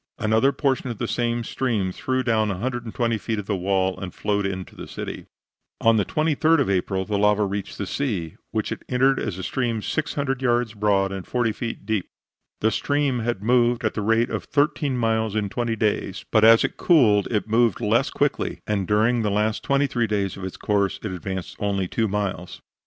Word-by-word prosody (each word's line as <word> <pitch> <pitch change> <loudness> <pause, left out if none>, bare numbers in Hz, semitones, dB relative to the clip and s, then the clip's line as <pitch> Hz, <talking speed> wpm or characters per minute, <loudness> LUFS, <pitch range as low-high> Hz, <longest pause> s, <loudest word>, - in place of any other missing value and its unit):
Another 110 +5 +3
portion 135 -3 0
of 115 - -5
the - - -2
same 120 -1 -1
stream 110 -6 -1
threw 130 +7 -1
down 110 -3 +1
120 115 +2 -2
feet 110 0 -3
of 105 - -4
the 100 - -1
wall 95 0 0
and 95 -1 -5
flowed 100 -1 0
into 95 -1 -6
the - - -8
city. - - -7 0.5
On 115 0 +4
the 105 - +2
23d 155 +1 +2
of 135 - +1
April 95 0 0
the 105 -1 -1
lava 105 0 +3
reached 100 0 -4
the 100 - -3
sea, 95 - -3
which - - -2
it - - -4
entered 135 +2 +3
as 100 -5 -3
a 95 - -6
stream 120 0 -1
600 140 +1 -2
yards 120 -3 +1
broad 100 -2 +1
and 95 -2 -6
40 120 -2 +1
feet 115 -2 -5
deep. 105 -4 -1 0.5
The 110 - +3
stream 145 -2 0
had 115 -4 -2
moved 120 +1 +3
at 110 - 0
the 105 - -3
rate 115 +3 +2
of - - -3
thirteen 145 -2 +1
miles 110 -2 0
in 105 -2 0
twenty 120 +1 -1
days, 105 -3 -1
but 110 -1 +4
as 115 0 +7
it - - -2
cooled 110 - +4
it 105 -1 -1
moved 115 0 +2
less 115 +5 +2
quickly, 145 -1 -1
and 100 -3 -1
during 115 +3 +2
the 105 - 0
last 105 +2 0
twenty 140 0 +2
three 120 -4 0
days 100 -3 -1
of 95 - -9
its 95 - -5
course, 100 -2 0
it 110 - -3
advanced 95 0 -5
only 100 -2 0
two 110 +4 0
miles. 100 -3 -3
110 Hz, 200 wpm, -24 LUFS, 100-120 Hz, 0.5 s, as